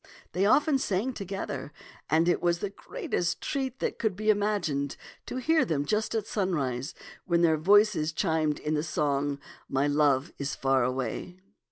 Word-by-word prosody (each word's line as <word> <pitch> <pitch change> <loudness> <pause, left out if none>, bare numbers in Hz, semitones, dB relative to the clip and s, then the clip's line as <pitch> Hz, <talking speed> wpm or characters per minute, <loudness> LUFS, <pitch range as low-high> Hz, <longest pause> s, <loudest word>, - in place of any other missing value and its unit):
They 190 +4 +2
often 285 +3 +4
sang 215 +4 -1
together, 195 -7 -5 0.4
and 160 +2 +3
it 175 - +2
was 175 -1 +2
the 200 +2 -4
greatest 180 -3 -3
treat 265 -3 -3
that - - -2
could 220 -5 0
be 215 +2 +3
im 205 - +1
agined 160 -10 -1 0.3
to - - -5
hear 315 +5 +3
them 145 -4 -1
just 215 +6 0
at 220 -2 0
sunrise, 150 - -2 0.3
when 170 -2 +2
their 160 -2 +5
voices 200 -1 +4
chimed 160 -3 0
in 150 - -2
the 150 - +1
song, 145 -2 0 0.2
" - - -22
My 135 +1 +1
love 145 -2 +2
is 140 -1 -2
far 135 -1 +2
away.' 130 +8 -3
170 Hz, 175 wpm, -28 LUFS, 145-210 Hz, 0.4 s, their